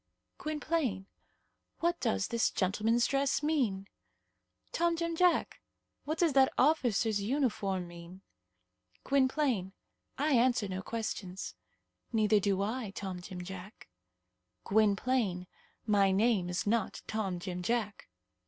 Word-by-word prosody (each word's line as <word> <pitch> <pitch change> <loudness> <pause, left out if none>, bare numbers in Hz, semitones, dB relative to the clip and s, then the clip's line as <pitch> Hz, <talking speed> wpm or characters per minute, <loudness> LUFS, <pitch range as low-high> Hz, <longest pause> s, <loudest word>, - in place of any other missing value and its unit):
"Gwynplaine, 300 -9 -1 0.7
what 345 +1 +1
does 95 0 0
this 235 -1 +2
gentleman's 215 +5 +1
dress 275 +1 +1
mean?" 240 -11 0 0.8
"Tom 340 0 +1
Jim 335 0 -2
Jack, 360 +1 +2 0.4
what 310 +3 -2
does 330 -4 +2
that 265 -1 +5
officer's 240 -7 +2
uniform 200 -7 -1
mean?" 175 +2 -12 0.8
"Gwynplaine, 260 -8 +1 0.4
I 295 +2 +1
answer 240 -3 +3
no 190 0 -4
questions." 195 -4 -4 0.6
"Neither 215 -2 +3
do 195 -1 +1
I, 225 +1 -3
Tom 190 -3 -5
Jim 180 0 -7
Jack." 190 +3 -10 0.7
"Gwynplaine, 205 -2 +1 0.4
my 200 -3 +4
name 195 -2 +2
is 180 +1 -2
not 215 -1 0
Tom 200 -5 -2
Jim 180 0 -5
Jack." 210 +1 -2
215 Hz, 115 wpm, -31 LUFS, 190-265 Hz, 0.8 s, that